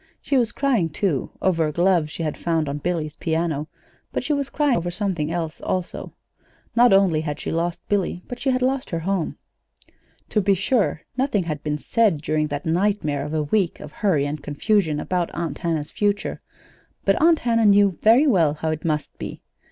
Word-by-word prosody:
She 280 - -2
was 240 -4 +3
crying, 245 - +1
too, 150 -3 -1
over 165 -4 +2
a - - -2
glove 175 -1 +2
she 165 - -5
had 155 -2 -2
found 165 -3 -1
on 140 +1 -3
Billy's 155 -1 -2
piano; 160 -2 -1 0.4
but - - -2
she 300 +4 0
was 280 -1 -1
crying 290 -3 +2
over 175 +1 -2
something 175 -5 -2
else, 165 -2 -3
also. 185 -1 -3 0.6
Not 240 +1 +6
only 190 -5 +4
had 150 -2 -4
she - - -4
lost 170 +1 -2
Billy, 185 -3 -1
but 245 - -7
she 270 - 0
had 255 -1 +1
lost 265 +1 0
her 165 -1 -2
home. 185 -1 -1 0.9
To 210 - +2
be 200 0 +3
sure, 200 - 0
nothing 255 -7 +1
had 155 -3 -4
been 150 -1 -2
said 210 +3 +2
during 155 0 0
that 145 -1 -4
nightmare 165 -4 0
of 150 +2 -4
a 155 - +1
week 185 +3 0
of 150 - -9
hurry 170 -10 +1
and 145 +1 -4
confusion 155 +2 +1
about 180 +1 -1
Aunt 165 -4 -3
Hannah's 160 -3 -2
future; 205 -1 -1 0.6
but 195 +5 +2
Aunt 330 0 +6
Hannah 230 -4 +2
knew 200 -3 +4
very 235 +7 +6
well 170 - +3
how 160 +1 -2
it 155 -1 -4
must 155 -2 -2
be. - - -7
175 Hz, 195 wpm, -23 LUFS, 155-210 Hz, 0.9 s, Not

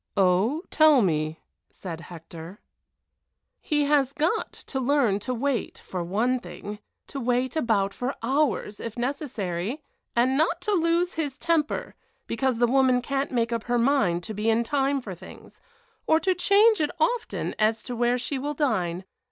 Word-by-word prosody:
"Oh, 200 - +2
tell 310 -6 +6
me," 155 -3 -1 0.3
said 165 -4 -7
Hector. 170 +2 -10 1.0
"He 295 -1 0
has 280 -2 +2
got 325 +9 0
to 265 - -6
learn 255 -6 +2
to 255 - -4
wait, 250 -1 -1
for 180 -2 -5
one 225 +9 0
thing, 210 -3 -8 0.3
to 275 - -6
wait 250 +1 0
about 210 -9 +1
for 250 +2 -3
hours 255 -5 0
if 230 0 -6
necessary, 240 - -3 0.3
and 250 +3 +3
not 320 +4 +2
to 420 - -1
lose 340 -1 +2
his 295 -4 -3
temper, 325 -3 0 0.3
because 255 +1 0
the 240 - +4
woman 255 0 +3
can't 275 +2 -2
make 235 -2 0
up 230 -1 -3
her 245 0 +1
mind 230 -9 +2
to 220 - -5
be 215 +2 -1
in 225 +1 +3
time 275 +1 0
for 200 -6 -7
things, 185 +2 -14 0.5
or 315 - +5
to 375 +2 +2
change 400 +3 +4
it 300 - +1
often - - -1
as 220 +1 +2
to 245 - -5
where 240 +1 +2
she 260 +2 -3
will 295 +2 -3
dine. 185 - -1
250 Hz, 165 wpm, -26 LUFS, 210-290 Hz, 1.0 s, tell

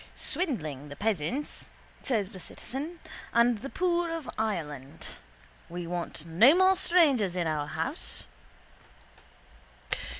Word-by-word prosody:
—Swindling 155 - -1
the 145 - -7
peasants, 220 - -2 0.3
says 215 -7 +1
the 190 - -9
citizen, 295 - -5 0.3
and 235 -1 +4
the 275 - -6
poor 345 0 +1
of 330 -5 -4
Ireland. 150 -11 -3 0.6
We 175 0 -4
want 170 -2 -4
no 215 - +7
more 375 +1 +6
strangers 285 - +4
in 175 -2 0
our 150 -2 0
house. 165 - -3
220 Hz, 110 wpm, -29 LUFS, -, 0.6 s, no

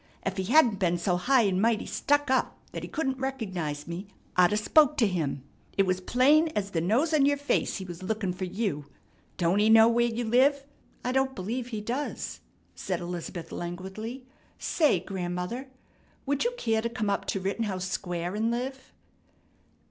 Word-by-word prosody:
Ef 195 0 -3
he 190 - -1
hadn't 235 -4 +4
been 175 -2 +2
so 180 +1 0
high 245 +7 +3
an' 190 -2 +1
mighty 225 0 +2
stuck 285 +7 +1
up 260 - +1
that - - -5
he - - -7
couldn't 265 -4 -2
recognize 190 - -3
me, 175 +4 -6 0.3
I'd 180 0 +5
'a' 210 - +2
spoke 300 +7 +4
to 235 - +4
him. 155 -9 -1 0.3
It 195 - +4
was 185 0 0
plain 290 - +4
ez 200 -1 -1
the 165 - 0
nose 245 - +2
on 285 -3 +5
your 285 0 +2
face 285 0 0
he 190 - -6
was 175 0 -8
lookin' 200 -1 -2
fer 185 +1 -4
you. 180 -7 -3 0.5
Don't 175 +3 +2
he 215 +1 +4
know 225 0 +8
where 235 +1 +3
you 235 +1 -2
live?" 270 +5 +3 0.4
"I 250 - +1
don't 265 0 +1
believe 230 +6 -3
he 220 -4 -4
does," 250 +7 -4 0.3
said 180 -3 -3
Elizabeth 175 -1 -6
languidly. 190 +9 -6 0.3
"Say, 300 - +2
grandmother, 180 +7 -4 0.6
would 285 0 0
you 485 - +1
care 225 - +1
to 235 - -2
come 215 -3 -1
up 200 - -1
to 195 - -1
Rittenhouse 190 -1 -2
Square 175 -1 -3
and 220 +2 0
live?" 260 +3 -4
215 Hz, 185 wpm, -28 LUFS, 185-255 Hz, 0.6 s, know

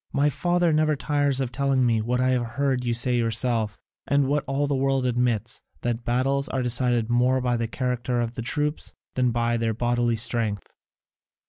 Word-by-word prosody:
My 145 +1 +2
father 175 +1 +1
never 155 0 +2
tires 145 -1 0
of 130 -2 -2
telling 135 0 +1
me 115 -2 +2
what 125 +3 -1
I 130 0 +2
have 125 -1 +2 0.2
heard 135 -3 +1
you 120 - -1
say 120 +1 +1
yourself, 115 -2 0 0.3
and 140 0 +3
what 145 +1 0
all 135 +2 0
the 145 - -1
world 135 -1 +1
admits, 120 -3 0 0.2
that 120 -1 -2
battles 135 +4 0
are 130 -1 -1
decided 120 -1 +1
more 125 +2 +3
by 125 -1 0
the 115 -1 -1
character 125 0 -2
of 115 -1 -2
the 120 - -5
troops 150 +5 -2 0.2
than 125 -1 +1
by 120 0 0
their 115 -1 -1
bodily 120 0 +1
strength." 110 -3 -1
125 Hz, 190 wpm, -25 LUFS, 120-135 Hz, 0.3 s, and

